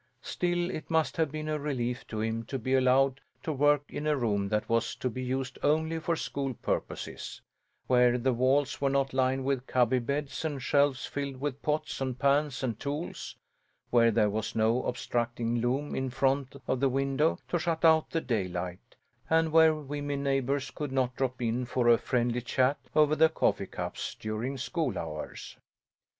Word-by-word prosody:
Still 175 0 -1
it 155 - -6
must 160 -1 +1
have 160 -4 +1
been 155 0 -4
a 155 0 -1
relief 125 -4 -3
to 110 -1 -4
him 115 +1 -1
to 135 - -3
be 130 +2 -2
allowed 135 +1 +3 0.2
to 155 - -2
work 145 +1 +3
in 150 - -4
a 150 -1 +2
room 100 -5 0
that 105 +1 0
was 115 0 0
to 125 - -2
be 130 - -5
used 130 0 -3
only 160 +2 +1
for 165 +1 0
school 135 -4 -3
purposes; - - -4 0.5
where 125 -1 +4
the 130 +1 +1
walls 130 +4 +1
were 140 - +3
not 135 -1 0
lined 130 0 +1
with 135 -2 -1
cubby 125 0 +3
beds 140 +4 -3
and 145 -5 -3
shelves 140 -1 +2
filled 140 -2 -4
with 140 -1 -3
pots 150 -2 -2
and 130 -2 -2
pans 140 -1 +1
and 115 -4 -2
tools; 145 +4 -5 0.6
where 115 -1 +5
there 105 -2 +2
was 110 +1 -3
no 115 +3 +2
obstructing 120 -1 -1
loom 135 +5 -1
in 130 0 -1
front 135 +1 0
of 130 - 0
the 135 0 +3
window 135 +4 +1
to 175 - 0
shut 165 0 0
out 160 -1 +5
the 165 - -1
daylight, 90 - -3 0.3
and 160 0 +3
where 160 0 +6
women 145 -1 -4
neighbours 135 0 0
could 145 -3 -5
not 130 -2 0
drop 130 -1 -2
in 120 +2 0
for 125 0 0
a 120 -1 +6
friendly 120 0 0
chat 130 +3 +1 0.2
over 155 0 +5
the 160 +1 +5
coffee 160 - 0
cups - - -5
during 110 +5 -3
school 135 - -2
hours. 75 -2 -6
135 Hz, 180 wpm, -29 LUFS, 120-145 Hz, 0.6 s, where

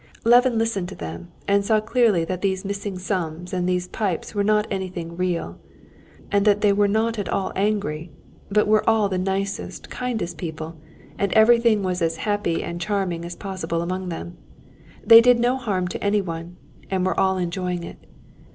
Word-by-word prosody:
Levin 245 +1 +5
listened 220 -5 -1
to 190 - -8
them, 85 +1 -7 0.2
and 200 0 +3
saw 215 +2 +3
clearly 215 -6 +2
that 185 +1 -4
these 190 -1 -1
missing 200 -1 -4
sums 180 -2 -3
and 180 0 0
these 180 0 0
pipes 195 -2 -3
were 205 -1 0
not 210 +1 +3
anything 185 -3 -4
real, 175 - -2 0.7
and 200 -1 +3
that 205 -1 +3
they 205 -1 +4
were 205 0 +3
not 220 +2 0
at 200 - -3
all 195 - -1
angry, 190 -6 -1 0.4
but 210 +1 +3
were 215 0 +4
all 220 -3 +3
the 185 -1 -1
nicest, 195 +1 -3
kindest 220 -10 -3
people, 160 0 -6 0.4
and 200 -2 0
everything 225 -1 +5
was 180 -1 -1
as 165 -1 0
happy 205 -5 -1
and 170 0 -5
charming 190 -4 -1
as 175 +1 -6
possible 170 -4 -3
among 185 +1 -3
them. 175 +1 -6 0.7
They 230 0 +10
did 245 0 +5
no 245 +2 +2
harm 200 -8 -1
to - - -5
anyone, 180 -4 -2 0.3
and 185 -1 0
were 185 - 0
all 190 -1 +2
enjoying 180 0 -2
it. - - -11
190 Hz, 180 wpm, -23 LUFS, 175-210 Hz, 0.7 s, They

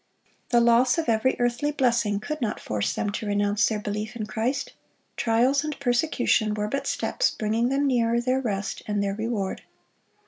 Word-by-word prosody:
The 240 -2 +4
loss 235 +3 +4
of 330 - -1
every 230 +3 +2
earthly 245 +4 0
blessing 240 -7 +1
could 305 +8 -5
not 220 -3 -1
force 105 -1 -2
them 205 - -1
to 210 +1 -4
renounce 205 +1 +2
their 220 - -1
belief 210 +2 -4
in 220 -3 -3
Christ. 225 +6 -2 0.4
Trials 250 +5 +2
and 305 -1 -4
persecution 245 -5 +1
were 210 0 -2
but 275 +6 -3
steps - - 0
bringing 225 +3 0
them 275 +2 +1
nearer 235 -3 +2
their 255 +2 0
rest 205 -4 -3
and 205 -1 0
their 200 -1 -1
reward. 215 -2 -3
230 Hz, 175 wpm, -25 LUFS, 210-255 Hz, 0.4 s, The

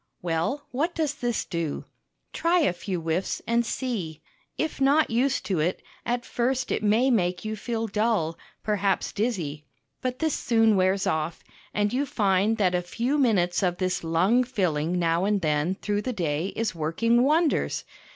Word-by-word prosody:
Well, 170 - -1
what 315 +8 -1
does 310 -3 0
this 240 -5 -2
do? 165 -4 -3 0.5
Try 345 +1 +2
a 285 - +2
few 180 0 -4
whiffs, 165 +3 -1
and 235 +1 +2
see. 215 - -3 0.4
If 315 -3 -2
not 285 +2 +4
used 255 +4 +1
to 185 -5 0
it, 170 +4 -1 0.2
at 240 0 -1
first 260 +2 -1
it - - 0
may 220 +5 +3
make 180 -4 +1
you 215 0 -2
feel 225 +1 -3
dull, 210 -6 0 0.3
perhaps 200 -2 0
dizzy. 170 - -2 0.3
But 255 -1 -2
this 315 0 0
soon 225 -2 +3
wears 190 +1 +2
off, 160 -3 -1 0.3
and 205 +1 0
you 280 +3 0
find 210 -4 +2
that 185 -4 +2
a 180 - +1
few 240 +11 -1
minutes 195 -10 +2
of 180 -2 +1
this 180 -1 -1
lung 185 +10 +3
filling 180 -8 0
now 170 0 +1
and 205 0 +2
then 155 +1 0
through 205 +1 -2
the 255 +3 -3
day 165 -4 -1
is 225 -3 -1
working 175 +10 +1
wonders. 305 +4 +2
205 Hz, 170 wpm, -26 LUFS, 175-245 Hz, 0.5 s, not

